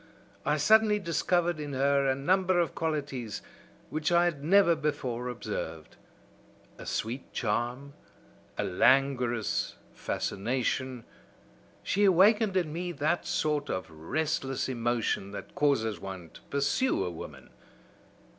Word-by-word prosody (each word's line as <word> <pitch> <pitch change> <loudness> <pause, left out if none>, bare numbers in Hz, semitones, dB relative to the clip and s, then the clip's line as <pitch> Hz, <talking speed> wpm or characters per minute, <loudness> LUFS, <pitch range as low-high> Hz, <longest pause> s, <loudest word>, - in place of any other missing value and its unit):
I - - +3
suddenly 220 -1 +5
discovered 175 -2 0
in 145 -1 -5
her 140 +1 +2
a 130 - +2
number 185 +5 +2
of 170 - 0
qualities 140 -9 -3 0.5
which 155 +2 -1
I 175 0 +5
had 155 -5 -2
never 170 +1 +5
before 135 -5 -2
observed, 80 -9 -5 0.8
a - - -9
sweet 120 +5 -3
charm, 120 +5 -2 0.6
a - - 0
languorous 125 0 +2 0.2
fascination; 125 +3 -2 0.8
she 205 - +1
awakened 200 +2 +5
in 165 -5 0
me 175 +2 -3
that 155 +3 0
sort 150 -2 0
of 95 -3 -3
restless 135 - -2
emotion 120 -5 -1
that - - -8
causes 125 -7 +1
one 95 -4 -8
to - - -15
pursue 140 - +1
a 90 - -3
woman. 85 - -10
140 Hz, 120 wpm, -29 LUFS, 120-170 Hz, 0.8 s, suddenly